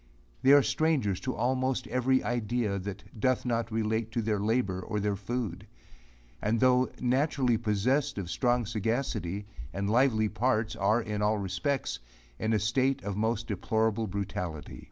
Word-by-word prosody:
They 135 - +5
are 145 -1 +7
strangers 135 - +1
to 130 - -3
almost 130 +3 0
every 130 +1 +1
idea, 120 -3 -1
that 100 +1 -6 0.2
doth 130 +3 +1
not 115 -1 -1
relate 110 0 -1
to 115 - 0
their 105 -1 0
labour 105 -3 0
or 105 +3 -3
their 105 0 0
food; 105 -2 -4 0.7
and 110 +2 +1
though 130 0 +4
naturally 130 0 +2
possessed 120 +6 +1
of 95 -3 -3
strong 120 -2 +1
sagacity, 110 -3 -2 0.3
and 100 +3 -2
lively 115 -3 +3
parts, 110 0 0
are, 110 +4 +2
in 105 -1 -3
all 105 +1 +2
respects, 105 - -2 0.4
in 110 - 0
a 110 - +3
state 130 +6 +1
of 100 -1 -3
most 110 +2 0
deplorable 110 +1 0
brutality. 90 -5 -4
110 Hz, 155 wpm, -29 LUFS, 105-125 Hz, 0.7 s, are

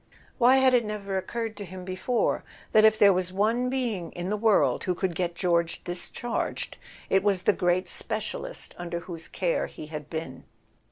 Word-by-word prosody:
Why 250 +2 +7
had 265 -1 +5
it 245 -2 +5
never 205 -2 -4
occurred 225 +3 -3
to 205 - -5
him 185 -1 -8
before 190 +6 0 0.3
that 215 - +6
if 220 0 +6
there 200 -2 +7
was 185 0 -1
one 225 +6 +1
being 235 -9 -2
in 175 +2 -4
the - - +2
world 215 -1 +3
who 180 - 0
could 185 -1 -1
get 175 0 -2
George 170 -2 0
discharged 185 +6 -3 0.3
it 190 - +5
was 195 -2 +1
the 205 - +4
great 180 0 +1
specialist - - -3
under 170 -1 -4
whose 170 -2 -7
care 180 -3 -1
he - - -9
had 150 -1 -7
been? 160 -5 -6
190 Hz, 180 wpm, -27 LUFS, 175-220 Hz, 0.3 s, Why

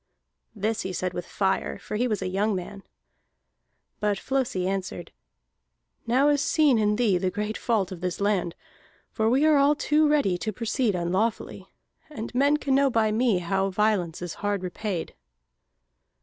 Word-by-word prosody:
This 215 +2 -1
he 190 - -4
said 185 0 -2
with 180 - -5
fire, 195 -1 -1
for - - -7
he 245 +4 +1
was 215 -3 -2
a - - -2
young 200 +3 0
man. 190 +2 -6 1.2
But 210 -1 0
Flosi 255 -7 -1
answered: 195 0 -4 1.0
"Now 265 +5 +3
is 290 -1 +2
seen 295 -8 +3
in 210 0 +2
thee 210 -6 +2
the 185 0 0
great 210 +3 -3
fault 210 -6 0
of 180 -2 -8
this 180 -1 -3
land, 200 -4 0 0.6
for 220 -1 +1
we 270 +5 +3
are 310 -2 +5
all 280 +1 +4
too 300 +1 +2
ready 240 -12 +2
to 215 - -2
proceed 230 0 -1
unlawfully. 185 +6 -2 0.4
And 235 -6 -7
men 280 +4 +3
can 280 -2 -1
know 275 +1 +4
by 225 -3 +2
me 225 -2 +2
how 190 +2 0
violence 190 -4 0
is 175 - -5
hard 205 -2 -1
repaid." 180 -1 -4
210 Hz, 165 wpm, -26 LUFS, 185-250 Hz, 1.2 s, are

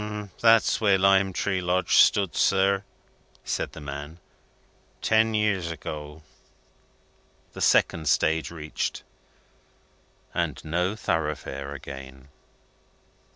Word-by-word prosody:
"That's 115 -1 +4
where 100 -3 +4
Lime 95 0 +3
Tree 95 0 -1
Lodge 90 +1 +1
stood, 100 -5 +4
sir," 95 +1 +2 0.6
said - - -3
the - - -9
man, 75 +2 -7 0.8
"ten 110 0 +2
years 100 -5 0
ago." 75 -1 -7 1.3
The - - -8
second 80 -3 +3
stage 80 +2 +1
reached, 80 -2 -4 1.3
and - - -2
No 90 +5 -1
Thoroughfare 75 -7 -3
again! 65 -1 -10
85 Hz, 95 wpm, -25 LUFS, 75-100 Hz, 1.3 s, That's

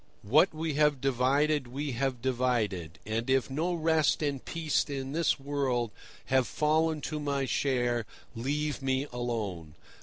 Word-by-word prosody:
"What 150 - +5
we 155 0 -3
have 150 -1 +3
divided 135 +2 +2
we 140 +4 -3
have 130 -1 -2
divided; 115 -10 0
and 115 +3 -2
if 130 0 +2
no 170 +6 0
rest 160 -1 +2
and 140 -3 -1
peace 160 -3 0
in 135 -2 -4
this 160 -1 +1
world 135 -5 -1 0.3
have 130 -1 +2
fallen 155 0 +1
to 155 0 -3
my 140 -2 -1
share, 120 -4 0 0.3
leave 145 +5 -2
me 135 +1 0
alone. 105 -10 -3
135 Hz, 145 wpm, -30 LUFS, 120-150 Hz, 0.3 s, What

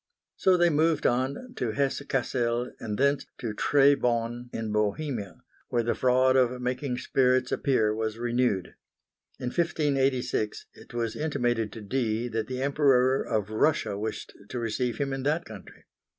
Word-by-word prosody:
So 185 -1 +3
they 175 -1 +4
moved 155 0 +2
on 135 - 0
to 115 -3 -1
Hesse 140 +2 0
Cassel 120 -2 -1
and 105 -2 -4
thence 140 0 +1
to 115 -4 -4
Tribau 125 -3 +2
in 110 -1 -4
Bohemia, 105 - -2 0.3
where 120 -1 +1
the 120 - +1
fraud 130 +1 +3
of 125 -1 +2
making 125 +1 -2
spirits 130 0 +2
appear 110 -6 +2
was 110 0 -3
renewed. 120 -5 0 0.7
In 125 - -2
1586, 135 -8 0
it - - -14
was 115 -2 -2
intimated 120 -8 -1
to 115 - -8
Dee 115 +1 -1
that 110 -1 -2
the 130 0 -3
Emperor 135 -2 +3
of 105 -1 -2
Russia 110 -2 +1
wished 110 +2 -5 0.2
to 125 - -5
receive 120 0 -1
him 140 -1 -1
in 135 - -3
that 155 +5 0
country. 105 -4 -12
125 Hz, 150 wpm, -27 LUFS, 115-135 Hz, 0.7 s, they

